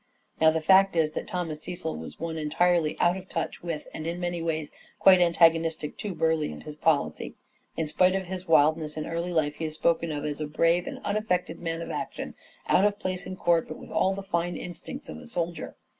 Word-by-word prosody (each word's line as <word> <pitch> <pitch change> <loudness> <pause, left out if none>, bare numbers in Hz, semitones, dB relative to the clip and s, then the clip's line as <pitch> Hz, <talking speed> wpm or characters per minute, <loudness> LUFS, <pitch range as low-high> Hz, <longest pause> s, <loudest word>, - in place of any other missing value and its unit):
Now 160 - +7
the 160 0 0
fact 190 +3 +5
is 160 -2 +2
that - - -5
Thomas 165 -4 -3
Cecil 175 -2 -4
was 80 - -8
one 165 0 -3
entirely 160 +1 +1
out 175 - +4
of 190 0 -10
touch - - -3
with 165 -3 -4
and 155 - -5
in 170 +1 -3
many 175 -1 -2
ways 160 -2 -2 0.3
quite 185 -2 +7
antagonistic 165 -2 +3
to 200 -4 -4
Burleigh 160 -2 +1
and - - -9
his 150 -1 -8
policy. 155 -1 0 0.4
In 160 - 0
spite 180 +5 +3
of 190 -1 -1
his 185 +1 -6
wildness 155 0 +3
in 155 - -3
early 170 +2 -3
life 150 -3 0
he 165 - -3
is 155 -1 -4
spoken 165 0 +1
of 145 0 -3
as 150 0 -3
"a 150 - -2
brave 165 +3 +2
and - - -6
un 205 +1 0
affected 180 -6 -1
man 165 -1 -3
of - - -6
action, - - -5 0.3
out 190 - +4
of 205 0 +2
place 185 -2 -3
in 185 - -5
court, 170 -2 +2
but - - -7
with - - -12
all 190 +1 +2
the 200 - -6
finest 175 -2 -2
instincts 265 +10 -8
of - - -7
a - - -10
soldier." 170 -6 -3
165 Hz, 225 wpm, -27 LUFS, 155-180 Hz, 0.4 s, Now